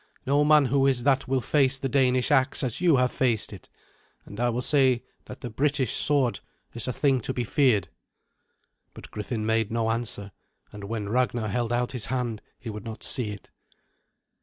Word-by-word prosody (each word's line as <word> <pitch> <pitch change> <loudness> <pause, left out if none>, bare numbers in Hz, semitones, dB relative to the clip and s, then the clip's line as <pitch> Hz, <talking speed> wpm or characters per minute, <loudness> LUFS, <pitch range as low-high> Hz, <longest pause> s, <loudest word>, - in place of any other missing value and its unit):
No 140 +2 +3
man 150 -1 +5
who 135 +2 +2
is 130 -3 +1
that 135 0 +2
will 130 0 +1
face 135 0 +2
the 135 - -3
Danish 130 -2 +2
axe 135 +2 +2
as 125 +4 -2
you 170 -4 +5
have 125 -1 +2
faced 115 -5 0
it, 95 - -12 0.6
and 100 - -10
I 120 0 +2
will 120 +2 -2
say 130 -4 +3 0.2
that 125 - -10
the 125 - -5
British 140 +2 +1
sword 140 -5 +2 0.3
is 115 0 -3
a - - 0
thing 135 0 +1
to 130 - -3
be 125 - -1
feared." 115 - +2 1.1
But - - -12
Griffin 110 +1 -4
made 110 -1 0
no 115 -1 0
answer, 115 -3 -4 0.4
and 105 -1 -9
when 105 -1 -4
Ragnar 120 -2 0
held 120 +3 -1
out 120 0 0
his 125 -4 -2
hand 120 -4 -2 0.2
he 115 - -6
would 105 -1 -8
not 110 -1 -8
see 120 -5 -1
it. 105 -2 -10
125 Hz, 190 wpm, -26 LUFS, 110-135 Hz, 1.1 s, man